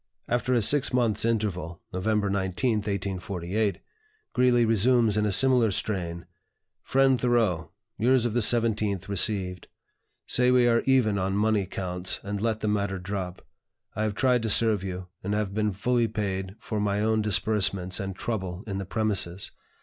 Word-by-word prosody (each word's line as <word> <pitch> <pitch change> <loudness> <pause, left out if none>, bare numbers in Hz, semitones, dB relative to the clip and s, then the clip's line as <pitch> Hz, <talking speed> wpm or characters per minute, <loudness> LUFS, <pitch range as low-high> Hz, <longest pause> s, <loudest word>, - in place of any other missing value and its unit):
After 120 +1 -1
a 115 - +2
six 140 +5 +3
months' 115 -4 +1
interval 95 -7 -2
(November 105 +3 0
19, 100 +5 0
1848), 100 -1 -2 0.5
Greeley 125 -2 +3
resumes 115 0 +3
in 105 0 +1
a - - 0
similar 125 +1 +4
strain: 85 -5 -3 0.6
"FRIEND 135 -1 +2
THOREAU, 115 -9 +1 0.3
Yours 125 +2 +3
of 120 - -1
the 120 - +2
17th 105 -4 +1
received. 95 -2 -1 0.6
Say 125 0 +3
we 125 -1 +4
are 115 -1 +3
even 115 -7 +3
on 95 +1 -1
money 105 -2 +1
counts, 90 0 -2
and 100 0 -4
let 110 -1 -1
the 110 - -1
matter 100 -2 -1
drop. 95 -1 -5 0.5
I 105 - -2
have 110 -1 -1
tried 125 -1 +2
to 110 - -2
serve 110 -3 +3
you, 90 -1 -5 0.2
and 100 +2 -1
have 105 -2 -2
been 105 0 0
fully 120 +4 +1
paid 95 -3 -3
for 110 - -4
my 105 0 0
own 110 0 +1
disbursements 100 -3 0
and 95 -1 -4
trouble 95 -4 -4
in 100 -3 -4
the 100 - -4
premises. 100 -3 -1
105 Hz, 160 wpm, -26 LUFS, 95-115 Hz, 0.6 s, similar